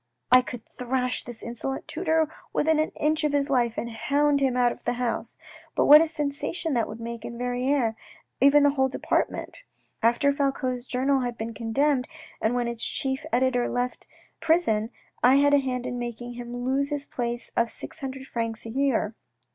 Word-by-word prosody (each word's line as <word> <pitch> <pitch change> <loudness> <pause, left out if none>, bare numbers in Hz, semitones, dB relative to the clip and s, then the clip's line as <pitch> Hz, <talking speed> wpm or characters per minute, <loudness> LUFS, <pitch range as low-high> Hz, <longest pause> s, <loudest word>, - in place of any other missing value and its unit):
" - - -54
I 255 0 +9
could 245 -2 -8
thrash 250 0 -2
this 240 -2 -10
insolent 240 +3 -5
tutor 320 -2 +1 0.3
within 315 0 +2
an 310 - +1
inch 305 +1 +1
of 300 -1 +1
his 285 0 +1
life 240 -3 +2
and 235 - -3
hound 285 +5 +2
him 265 -2 +1
out 245 -1 +4
of - - -10
the - - 0
house; 245 -1 -2 0.4
but - - +3
what 300 +2 +10
a 325 - +2
sensation 300 +1 -3
that 235 -3 +1
would 220 - -8
make 235 0 -6
in 235 - -6
Verrieres 250 0 0
and - - -31 0.5
even 290 +1 +6
over - - +6
the - - -10
whole 265 0 +4
department! 385 - -2 0.4
After 240 +5 +3
Falcoz' 265 -3 -1
journal 270 +2 +1
had 245 -2 -3
been 225 +1 -4
condemned, 250 +4 +1 0.3
and 220 +3 +1
when 245 -1 0
its 235 -1 -4
chief 265 0 -2
editor 245 0 +2
left 245 0 -3 0.3
prison, 230 -10 +2 0.3
I 250 +2 +6
had 285 +1 +4
a 285 - +6
hand 255 -2 -2
in 250 -1 -3
making 240 0 -5
him 245 0 -6
lose 275 +2 +1
his 290 -1 -3
place 240 -2 -4
of 235 0 +2
six - - -8
hundred 265 -1 -6
francs 230 -3 -4
a - - -5
year. 255 -3 +1
255 Hz, 195 wpm, -26 LUFS, 240-280 Hz, 0.5 s, what